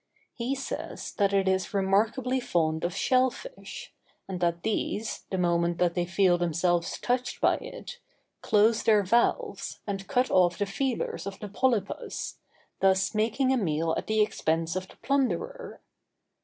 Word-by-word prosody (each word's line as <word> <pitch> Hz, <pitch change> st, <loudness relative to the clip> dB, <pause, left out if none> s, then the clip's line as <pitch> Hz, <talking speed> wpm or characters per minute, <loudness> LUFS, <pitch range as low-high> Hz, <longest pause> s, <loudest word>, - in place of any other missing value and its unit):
He 250 Hz, +3 st, -2 dB
says 270 Hz, -, -5 dB
that 200 Hz, -1 st, +3 dB
it 195 Hz, -1 st, +2 dB
is 190 Hz, +2 st, 0 dB
remarkably 220 Hz, +7 st, +1 dB
fond 160 Hz, -8 st, 0 dB
of 175 Hz, 0 st, -1 dB
shell 255 Hz, 0 st, +3 dB
fish, -, -, -10 dB, 0.3 s
and 190 Hz, -2 st, -4 dB
that 170 Hz, -1 st, 0 dB
these, 220 Hz, 0 st, -2 dB
the 190 Hz, -, -2 dB
moment 170 Hz, -1 st, +1 dB
that 175 Hz, -1 st, +2 dB
they 175 Hz, -1 st, -1 dB
feel 175 Hz, 0 st, +3 dB
themselves 175 Hz, 0 st, 0 dB
touched 250 Hz, +1 st, -1 dB
by -, -, +3 dB
it, 485 Hz, -, -9 dB, 0.4 s
close 220 Hz, +2 st, +3 dB
their 215 Hz, -2 st, +4 dB
valves, 235 Hz, +6 st, 0 dB
and 195 Hz, -1 st, -4 dB
cut 255 Hz, -1 st, +1 dB
off 175 Hz, -2 st, +4 dB
the 205 Hz, -, 0 dB
feelers 235 Hz, 0 st, -2 dB
of 195 Hz, -, -6 dB
the 210 Hz, -, -6 dB
polypus, 225 Hz, -2 st, -1 dB, 0.4 s
thus 190 Hz, +1 st, +3 dB
making 225 Hz, +5 st, +1 dB
a -, -, +2 dB
meal 160 Hz, -5 st, 0 dB
at -, -, -4 dB
the 215 Hz, 0 st, +2 dB
expense 165 Hz, -5 st, -1 dB
of 185 Hz, 0 st, -3 dB
the -, -, -17 dB
plunderer. 445 Hz, -, -1 dB
200 Hz, 155 wpm, -28 LUFS, 175-245 Hz, 0.4 s, their